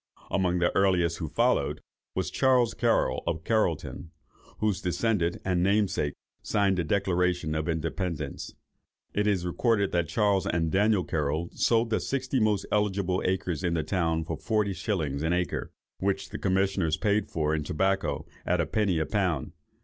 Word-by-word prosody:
Among 90 -2 +1
the 90 0 +1
earliest 90 -4 +2
who 80 -4 -3
followed, - - +1 0.4
was - - -1
Charles 125 -3 +3
Carroll, - - +1
of 80 -1 -1
Carrollton, 90 -6 -1 0.5
whose 105 -3 0
descendant 90 -1 0
and 90 -2 +1
namesake 95 -7 +1 0.3
signed 100 -3 +1
the - - +1
Declaration 90 -2 0
of 80 +2 -2
Independence. 80 -2 -3 0.6
It 105 +1 +1
is 95 -4 +1
recorded 100 +2 +1
that 85 -2 +1
Charles 100 -1 +1
and 80 -1 0
Daniel 105 -1 +3
Carroll 80 +1 -2
sold 115 0 +2
the 110 - +2
sixty 130 -1 -1
most 105 -3 +1
eligible 100 -3 +1
acres 90 -4 -1
in 85 -2 +1
the 80 - 0
town 80 -1 0
for - - -4
forty 105 -3 0
shillings 80 -7 -2
an 80 +2 +1
acre, 90 0 -2 0.3
which 95 0 -1
the - - -6
commissioners 95 -4 +1
paid 105 0 +1
for 75 -1 0
in 80 -1 -1
tobacco, 80 -2 0 0.2
at 90 0 +1
a 85 - +2
penny 95 +2 +1
a 80 - +1
pound. 90 -7 -1
90 Hz, 160 wpm, -28 LUFS, 80-100 Hz, 0.6 s, Charles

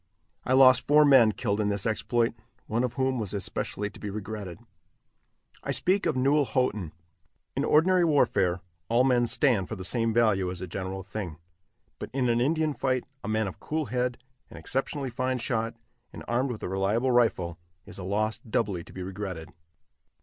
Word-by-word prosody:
I 130 - +1
lost 130 -1 +6
four 150 +1 +6
men 130 -6 +6
killed 100 -1 -1
in 105 - +1
this 100 -1 -2
exploit, 115 +1 0 0.3
one 115 +3 -1
of 125 -1 -2
whom 130 -2 0
was 105 -2 -3
especially 100 +1 -3
to - - -14
be 105 - -5
regretted. 100 -3 -6 1.1
I - - -7
speak 190 +2 +1
of - - 0
Newell 140 +3 +3
Houghton. 110 - -1 0.6
In - - 0
ordinary 180 +4 +4
warfare, 95 - +2 0.3
all 120 +2 +4
men 125 -2 +3
stand 115 -9 +2
for - - -4
the 95 - -7
same 115 +4 +2
value 110 -5 +2
as 90 -1 -6
a 95 - -4
general 95 +1 -5
thing; 95 -4 -6 0.6
but - - -6
in 130 -2 +1
an 120 0 +2
Indian 155 +3 +1
fight, 130 -2 0 0.2
a - - -5
man 110 0 +1
of 95 - -7
cool 155 0 -2
head, 125 0 0 0.3
an - - -11
exceptionally 135 - -2
fine 130 +1 -1
shot, 115 -2 -2 0.4
and - - -9
armed 125 +3 0
with 115 -4 -6
a - - -2
reliable 100 +7 0
rifle, 95 -9 +1 0.3
is - - -7
a - - -6
loss 105 +3 -1
doubly 100 -7 -2
to - - -15
be 95 - -6
regretted. 95 -4 -6
115 Hz, 185 wpm, -27 LUFS, 100-130 Hz, 1.1 s, lost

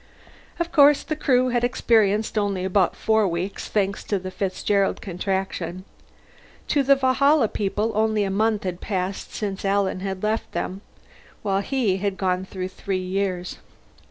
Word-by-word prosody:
Of 340 0 -1
course, 290 -1 +6
the 310 - -3
Crew 255 -4 +2
had 240 -1 0
experienced 220 -4 +2
only 200 -3 0
about 190 -1 +2
four 220 -2 +2
weeks, 180 +3 -3
thanks 200 -2 -1
to 205 - 0
the 185 0 -6
Fitzgerald 195 +1 0
Contraction. 185 -1 -3 0.8
To 285 - +3
the 275 +1 +5
Valhalla 270 0 +3
people 210 +2 -1
only 215 0 +2
a 195 - -1
month 215 +1 +1
had 180 -2 -4
passed 190 -1 -3
since 200 -3 -3
Alan 195 -1 +1
had 190 0 -4
left 215 +1 -1
them, 190 +2 -3 0.6
while 195 -2 +1
he 220 -4 0
had 195 0 -2
gone 185 -1 0
through 185 -1 -5
three 190 0 -3
years. 185 -1 -2
200 Hz, 155 wpm, -23 LUFS, 190-220 Hz, 0.8 s, course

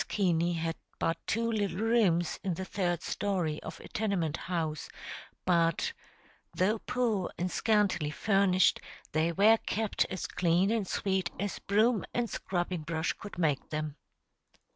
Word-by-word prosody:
Keaney 175 -3 +1
had 165 0 -2 0.2
but 165 - +1
two 230 +1 +1
little 200 -5 -1
rooms 205 -7 +2
in 185 -3 -1
the 190 - -4
third 175 -3 -1
story 180 -7 -1
of - - -8
a - - -10
tenement 195 -8 0
house, 160 -4 -3 0.6
but 170 -2 +2 0.6
though 210 +5 +2
poor 230 -7 0
and 180 +1 -1
scantily 200 -8 +2
furnished, 195 +2 +3 0.3
they 160 +2 +2
were 210 +6 +6
kept 220 -1 +1
as 185 - -4
clean 180 +3 +2
and 220 -4 0
sweet 190 -2 0
as 205 +1 -2
broom 215 +2 +2
and 240 -2 0
scrubbing 175 -2 -2
brush 160 +1 -1
could 205 -2 -10
make 150 -5 0
them. 155 -1 -3
185 Hz, 140 wpm, -30 LUFS, 165-205 Hz, 0.6 s, were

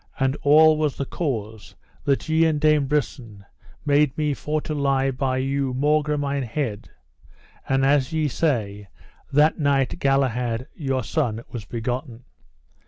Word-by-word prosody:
And 135 +1 +1
all 155 +2 +6
was 150 -3 0
the 140 - -2
cause, 110 - -5 0.3
that 140 -1 0
ye 160 +1 +3
and 155 -2 +1
Dame 150 -2 +3
Brisen 120 -8 -3 0.4
made 145 -1 +2
me 150 -2 0
for 150 +2 -2
to 155 0 -5
lie 135 -2 +1
by 130 0 -1
you 135 0 -1
maugre 150 +2 +1
mine 140 -1 -1
head; 120 -4 -4 0.8
and 135 0 +2
as 140 0 +2
ye 160 -2 0
say, 110 -9 -1 0.4
that 150 +4 +3
night 140 -3 +1
Galahad 125 -3 0
your 135 -4 -2
son 115 -2 -2
was 115 -4 -6
begotten. 120 +2 -5
135 Hz, 145 wpm, -23 LUFS, 125-150 Hz, 0.8 s, all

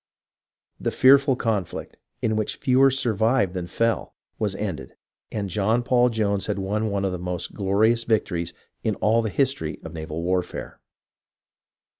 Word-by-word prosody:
The - - -1
fearful 135 +1 +5
conflict, 105 -8 -3 0.3
in 110 -1 +1
which 110 -1 -1
fewer 130 +1 +4
survived 115 -5 +1
than 90 -2 -4
fell, 115 +3 -1 0.2
was 105 -3 -1
ended, 95 -6 -5 0.4
and 105 -2 -2
John 105 +6 +1
Paul 125 0 +3
Jones 100 -4 0
had 105 - -1
won 105 +3 -1
one 100 -1 -1
of 95 - 0
the 90 - -4
most 90 -1 -4
glorious 110 +4 +2
vic 110 -2 +2
tories 85 -2 -3 0.3
in 110 - 0
all 110 +4 +2
the 110 - -2
history 85 - -1
of - - -8
naval 80 0 -5
warfare. 90 0 -2
105 Hz, 155 wpm, -24 LUFS, 95-115 Hz, 0.4 s, fearful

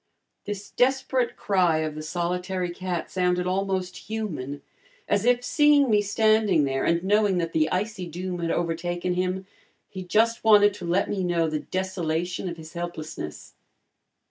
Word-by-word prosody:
This 205 0 -6
desperate 260 -1 +1
cry 180 -5 +2
of 155 -1 -2
the 155 - -6
solitary 180 +3 -2
cat 175 -1 -4
sounded 180 -1 +1
almost 185 -1 -1
human, 155 -11 -4 0.4
as 205 +2 +1
if, 245 0 +3
seeing 295 -4 +4
me 210 -1 +4
standing 210 -4 +3
there, 135 -1 -1
and 170 +1 +1
knowing 205 -1 +3
that 165 -1 -2
the 155 0 +2
icy 190 -1 -2
doom 180 +2 -5
had 170 -1 -2
overtaken 175 +2 -1
him, 185 +1 -1 0.4
he 190 - -7
just 225 +5 +2
wanted 205 -2 +6
to 195 -3 -8
let 180 +3 +1
me 195 -2 -2
know 170 -2 +1
the 155 -1 -2
desolation 180 -1 -2
of 170 - -7
his 160 0 -11
helplessness. 160 - -6
180 Hz, 155 wpm, -25 LUFS, 170-205 Hz, 0.4 s, wanted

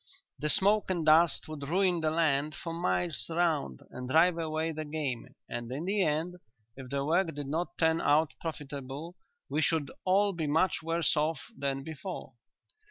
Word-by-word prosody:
The 150 - 0
smoke 205 +5 +5
and 175 -4 -1
dust 160 +2 +5
would 145 -3 -6
ruin 180 0 +2
the 155 - +2
land 155 -2 +1
for 165 +2 -6
miles 170 -1 -1
round 160 - 0
and 125 0 -7
drive 165 +5 +5
away 160 0 -2
the 155 0 -4
game, 145 -6 -4
and 120 0 -5
in 145 +6 -4
the 200 +2 +1
end, 165 +2 0 0.4
if 130 -1 -9
the 140 0 -1
work 165 +1 +1
did 145 -1 -4
not 160 +6 -3
turn 160 0 +2
out 150 +2 +3
profitable, 145 +1 -6 0.3
we 155 - -1
should 155 -2 0
all 200 +2 +3
be 165 -3 -2
much 160 +5 +2
worse 165 +1 +1
off 155 0 0
than 135 0 -2
before." 160 -1 -7
160 Hz, 170 wpm, -30 LUFS, 145-170 Hz, 0.4 s, smoke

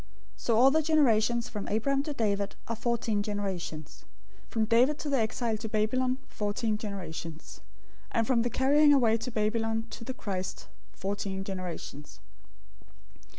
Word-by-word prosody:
001:017 - - -23 0.3
So 230 -2 +1
all 260 +3 +7
the 315 +2 +3
generations 240 -7 +3
from 210 -4 -5
Abraham 270 +6 +1
to 300 +1 -4
David 205 -5 0
are 230 - -2
fourteen 230 -2 0
generations; 195 -6 -4 0.5
from 220 -2 +1
David 245 +6 +4
to 300 - -4
the 275 - +3
exile 225 0 0
to 220 +1 -6
Babylon 250 +4 +1
fourteen 210 +1 -1
generations; 170 -6 -6 0.5
and 230 -1 +1
from 235 0 +3
the 240 - 0
carrying 290 +5 +5
away 230 -5 +4
to 230 - -5
Babylon 225 0 0
to - - -7
the 260 +2 -5
Christ, 190 -6 -4 0.2
fourteen 195 0 -3
generations. 180 -6 -6
225 Hz, 150 wpm, -29 LUFS, 205-250 Hz, 0.5 s, all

